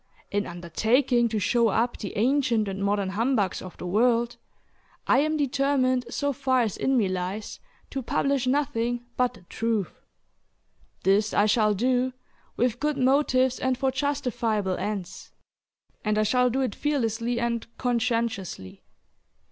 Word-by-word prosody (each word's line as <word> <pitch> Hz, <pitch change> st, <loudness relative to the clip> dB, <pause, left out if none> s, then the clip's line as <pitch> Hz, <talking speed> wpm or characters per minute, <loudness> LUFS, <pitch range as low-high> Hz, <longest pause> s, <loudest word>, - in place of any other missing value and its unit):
In 205 Hz, 0 st, -1 dB
undertaking 230 Hz, -, +1 dB
to 220 Hz, -, -2 dB
show 230 Hz, +3 st, +2 dB
up 230 Hz, +3 st, +1 dB
the 200 Hz, -, -6 dB
"Ancient 240 Hz, -2 st, +2 dB
and 195 Hz, 0 st, -3 dB
Modern 200 Hz, -1 st, 0 dB
Humbugs 215 Hz, -1 st, 0 dB
of 185 Hz, -, -10 dB
the -, -, -7 dB
World," 235 Hz, +5 st, +2 dB, 0.7 s
I 260 Hz, -, +4 dB
am 310 Hz, +2 st, +1 dB
determined 270 Hz, -2 st, +1 dB
so 285 Hz, +1 st, -1 dB
far 260 Hz, -1 st, +1 dB
as 220 Hz, -5 st, -1 dB
in 265 Hz, 0 st, +1 dB
me 215 Hz, -5 st, +3 dB
lies, 185 Hz, +3 st, -4 dB, 0.3 s
to 270 Hz, -, -3 dB
publish 270 Hz, +1 st, 0 dB
nothing 245 Hz, -4 st, 0 dB
but 250 Hz, -1 st, +1 dB
the -, -, -16 dB
truth. 220 Hz, 0 st, -2 dB, 1.0 s
This 205 Hz, +3 st, +2 dB
I 205 Hz, -, +4 dB
shall 215 Hz, -1 st, +3 dB
do, 250 Hz, +4 st, +1 dB, 0.4 s
"with 245 Hz, -1 st, +1 dB
good 300 Hz, -1 st, 0 dB
motives 260 Hz, -1 st, +2 dB
and 260 Hz, -1 st, 0 dB
for 265 Hz, +1 st, +1 dB
justifiable 245 Hz, -8 st, -1 dB
ends," 190 Hz, -3 st, -5 dB, 0.7 s
and 215 Hz, 0 st, 0 dB
I 215 Hz, -, +3 dB
shall 250 Hz, +4 st, +3 dB
do 260 Hz, +3 st, 0 dB
it 255 Hz, -6 st, -1 dB
fearlessly 240 Hz, -5 st, -1 dB
and 235 Hz, -1 st, -2 dB
conscientiously. 230 Hz, -, -2 dB
235 Hz, 145 wpm, -26 LUFS, 210-260 Hz, 1.0 s, I